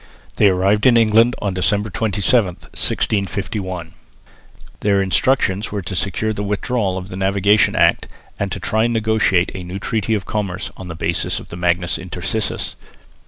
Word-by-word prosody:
They 105 - +5
arrived 100 +5 +3
in 120 -2 +6
England 115 +2 +4
on 100 -2 -1
December 100 +3 0
27, 100 -1 +1
1651. 95 -4 -2 0.9
Their 100 -1 +2
instructions 100 +1 +1
were 100 -2 -3
to 95 - -5
secure 105 +4 -1
the 105 - -4
withdrawal 100 -1 -1
of 95 +1 -7
the 90 - -7
Navigation 100 +2 +2
Act - - +3 0.3
and 100 -1 -2
to 95 - -3
try 110 +4 0
to 115 - +2
negotiate 110 -5 +2
a 95 - -6
new 90 +2 -6
treaty 110 +2 -1
of 100 - -3
commerce 100 -4 -3
on 95 - -9
the 85 - -6
basis 85 +1 -1
of - - -13
the - - -8
Magnus 85 -4 0
Intercursus. - - -2
100 Hz, 165 wpm, -19 LUFS, 95-110 Hz, 0.9 s, in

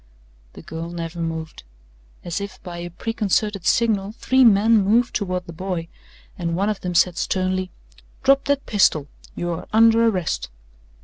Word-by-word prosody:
The - - -12
girl 165 +1 -6
never 170 0 -6
moved. 160 -1 -4 0.6
As 175 +3 -3
if 200 0 -7
by 175 -1 -7
a 175 0 -5
preconcerted 210 0 -1
signal 215 -3 +1
three 260 +3 +2
men 220 -1 +5
moved 230 +5 +2
toward 185 -3 -2
the 170 - -9
boy, 175 -1 -4 0.5
and 170 -1 -1
one 200 +4 0
of 210 - -3
them 180 -1 -4
said 175 0 +3
sternly: 185 0 -1 0.5
"Drop 275 0 +4
that 285 -1 0
pistol. 155 -8 +2 0.3
You 175 0 -3
are 165 - -5
under 225 +1 +5
arrest.' 185 - -1
185 Hz, 160 wpm, -22 LUFS, 170-220 Hz, 0.6 s, men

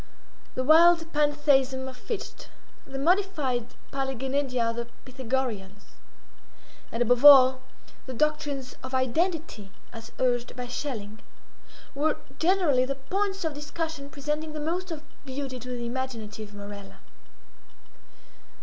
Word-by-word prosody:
The 255 - 0
wild 325 +3 +6
Pantheism 285 -3 +2
of 260 - -7
Fichte; 415 - -6 0.4
the 270 - -6
modified 290 - 0 0.2
Paliggenedia 265 -2 -1
of - - -8
the 235 0 -3 0.2
Pythagoreans; 245 -6 -3 1.0
and, 230 +1 +1
above 245 +2 +2
all, 260 -3 +9 0.5
the 260 - -5
doctrines 290 -2 -1
of 260 0 -5
Identity 295 - -1 0.2
as 225 -1 -10
urged 245 -1 0
by 250 -1 -4
Schelling, 225 -5 -5 0.7
were 300 +2 +1 0.2
generally 330 -7 +3
the 275 +1 -2
points 390 +7 -2
of 315 - -1
discussion 300 0 -5
presenting 300 +2 -3
the 305 - -4
most 350 +5 -2
of 315 -3 -6 0.2
beauty 265 -1 -5
to 250 +1 -9
the 240 -1 -4
imaginative 230 -4 -5
Morella. 205 -1 -9
265 Hz, 120 wpm, -27 LUFS, 245-305 Hz, 1.0 s, all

